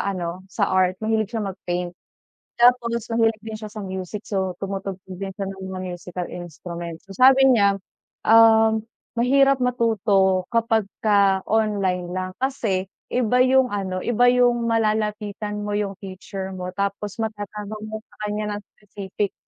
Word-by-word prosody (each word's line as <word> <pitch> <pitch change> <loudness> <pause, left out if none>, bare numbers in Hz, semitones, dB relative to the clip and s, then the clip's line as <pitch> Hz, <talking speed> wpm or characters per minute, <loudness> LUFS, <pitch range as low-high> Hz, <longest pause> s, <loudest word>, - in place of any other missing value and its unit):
ano, 175 -1 -4
sa - - 0
art, 185 0 +3
mahilig 220 -2 +1
siya 225 -2 -3
mag-paint. 180 -2 -4 0.7
Tapos 235 -2 +3
mahilig 225 -1 +2
din 220 -1 -5
siya 215 -1 -8
sa 215 0 -7
music, 190 +2 -5
so, 190 -3 -2
tumutugtog 195 -1 -5
din 195 -1 -4
siya 195 - -2
ng 190 0 -9
mga 185 0 -5
musical 175 0 -6
instruments. 170 -1 -7
So, 195 - -10
sabi 265 +1 +7
niya, 200 -4 +4 0.5
ah, 225 0 +6 0.4
mahirap 275 +2 +4
matuto 210 -6 +2
kapagka 205 -3 +2
online 200 -5 +1
lang. 185 0 -3
Kasi 225 -8 -1 0.2
iba 250 0 +2
yung 260 0 +4
ano, 190 -2 -2
iba 245 +1 +4
yung 245 -1 +3
malalapitan 210 -2 -1
mo 205 - -2
yung 200 -2 -2
teacher 190 -1 -7
mo, 180 0 -5
tapos 200 0 -2
matatanong 210 -1 -5
mo 220 - -4
sa - - -23
kanya 210 0 -2
ng 205 - -6 0.2
specific, 200 -1 -4
205 Hz, 145 wpm, -23 LUFS, 190-225 Hz, 0.7 s, sabi